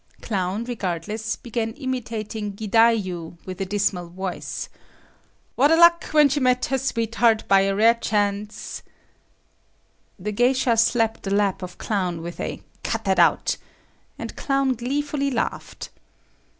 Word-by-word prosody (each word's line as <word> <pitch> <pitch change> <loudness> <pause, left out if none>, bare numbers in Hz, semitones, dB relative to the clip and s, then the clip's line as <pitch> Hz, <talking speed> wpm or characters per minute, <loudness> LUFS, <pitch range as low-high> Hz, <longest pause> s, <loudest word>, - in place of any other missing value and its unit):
Clown, 195 0 -2
regardless, 215 -1 -3
began 230 -2 -3
imitating 225 -5 -4
"gidayu" 200 -5 +1
with 185 +1 -6
a 190 - -2
dismal 195 -3 0
voice,—"What 190 +8 -4
a 325 - +6
luck, 340 0 +6
when 300 -1 +5
she 280 +1 0
met 250 -1 +2
her 270 0 0
sweet 230 -4 -2
heart 230 -2 +3
by 195 0 +5
a 195 0 +1
rare 225 +3 +6
chance…." 205 -2 -2 1.4
The 210 +2 -4
geisha 245 +2 +2
slapped 225 0 +2
the 195 0 -1
lap 200 -2 +1
of 180 -1 -7
Clown 180 -6 -2
with 170 0 -7
a - - -4 0.2
"Cut - - -2
that - - +1
out," - - +3 0.6
and - - -7
Clown 275 -1 +1
gleefully 280 +4 -1
laughed. 255 - -4
220 Hz, 135 wpm, -23 LUFS, 195-250 Hz, 1.4 s, a